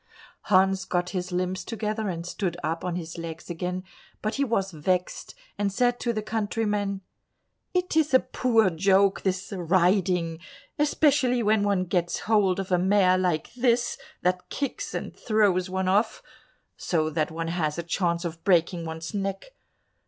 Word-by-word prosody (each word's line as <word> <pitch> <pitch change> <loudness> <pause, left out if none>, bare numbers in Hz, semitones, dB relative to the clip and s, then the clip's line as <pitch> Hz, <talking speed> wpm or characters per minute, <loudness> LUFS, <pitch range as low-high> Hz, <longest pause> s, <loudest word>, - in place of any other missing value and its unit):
Hans 190 -1 +3
got 180 -1 -1
his 180 -1 -3
limbs 185 +1 -1
together 215 -1 -3
and 170 -2 -4
stood 180 -1 -3
up 165 +2 -2
on 180 -1 -2
his 170 -1 -6
legs 165 +1 -7
again, 180 +2 -3 0.4
but 215 +1 -1
he 280 - 0
was 195 -7 0
vexed, 180 - -2 0.2
and 200 -1 +1
said 245 +3 +1
to 240 - 0
the 215 -2 -3
countryman, 210 -2 -1 0.7
"It 360 -2 0
is 315 -2 +3
a 260 - +7
poor 225 -8 +2
joke, 195 +3 +3
this 190 +1 -2
riding, 180 -1 +2 0.4
especially 285 -5 +3
when 215 0 +3
one 200 -2 +1
gets 175 -1 -1
hold 200 -4 +2
of 195 -1 -4
a 180 - +4
mare 185 0 +4
like 175 -4 -1
this, 240 -1 +1 0.3
that 180 0 0
kicks 280 -3 -4
and - - -5
throws 200 -5 +2
one 190 0 -1
off, 205 +4 +1 0.5
so 155 -3 0
that 155 -1 0
one 165 +1 -4
has 160 -3 -1
a 170 - -2
chance 170 0 -1
of 165 -1 -6
breaking 170 -2 +2
one's 160 +2 -6
neck. 195 - -4
190 Hz, 160 wpm, -26 LUFS, 175-215 Hz, 0.7 s, a